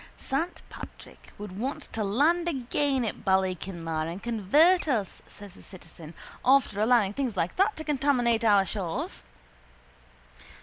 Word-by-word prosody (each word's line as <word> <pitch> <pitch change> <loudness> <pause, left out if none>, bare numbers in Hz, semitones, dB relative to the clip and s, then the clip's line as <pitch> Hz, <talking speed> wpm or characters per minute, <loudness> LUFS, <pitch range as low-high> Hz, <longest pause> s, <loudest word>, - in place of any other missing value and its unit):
—Saint 320 +6 -3
Patrick - - -12
would 205 -2 -8
want 275 +5 -3
to 220 - -2
land 300 - +2
again 270 -2 0
at 215 - -5
Ballykinlar 180 -4 -1
and 180 +4 -8
convert 290 - +3
us, 225 -9 -1
says 205 -3 -13
the - - -16
citizen, 170 -3 -12 0.3
after 255 -6 +3
allowing 220 -3 +3
things 245 -5 -3
like 175 0 -1
that 400 +3 +3
to 315 - -4
contaminate 265 -6 +1
our 205 -3 +5
shores. 185 -5 -4
225 Hz, 135 wpm, -27 LUFS, 190-280 Hz, 0.3 s, our